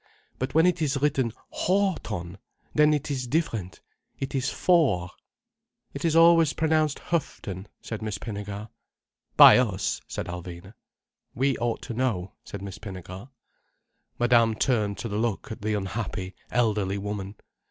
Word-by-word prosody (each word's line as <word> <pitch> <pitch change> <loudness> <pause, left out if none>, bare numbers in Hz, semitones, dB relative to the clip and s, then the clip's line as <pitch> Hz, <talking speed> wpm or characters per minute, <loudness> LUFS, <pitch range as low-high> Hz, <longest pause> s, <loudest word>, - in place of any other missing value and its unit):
But 130 +2 -3
when 160 +1 +6
it 180 -1 +2
is 140 -2 +1
written 135 -4 +1 0.2
Hough 190 -1 +1
ton! 90 -3 -6 0.3
then 150 0 +5
it 150 0 -1
is 130 -3 -2
different, 120 - -2 0.4
it 135 0 -4
is 135 0 0
for." 130 - +2 0.8
"It 140 - -6
is 165 -2 +2
always 165 -2 +6
pronounced 155 -2 +1 0.2
Huff 165 -4 0
ton," 95 -2 -6
said 115 -1 -6
Miss 110 -2 -3
Pinnegar. 105 0 -6 0.7
"By - - +10
us," 100 -7 -1
said - - -4
Alvina. 90 +2 -8 0.6
"We 135 +1 +2
ought 120 0 -1
to 125 - -5
know," 110 -7 -1
said 100 -1 -8
Miss 100 -2 -7
Pinnegar. 95 +2 -8 0.9
Madame 120 -2 +4
turned 105 -5 +1
to - - -4
look 110 0 -2
at 110 - -7
the 105 +1 0
unhappy, 95 -1 -4 0.2
elderly 105 -5 +1
woman. 100 0 -5
115 Hz, 145 wpm, -26 LUFS, 100-140 Hz, 0.9 s, By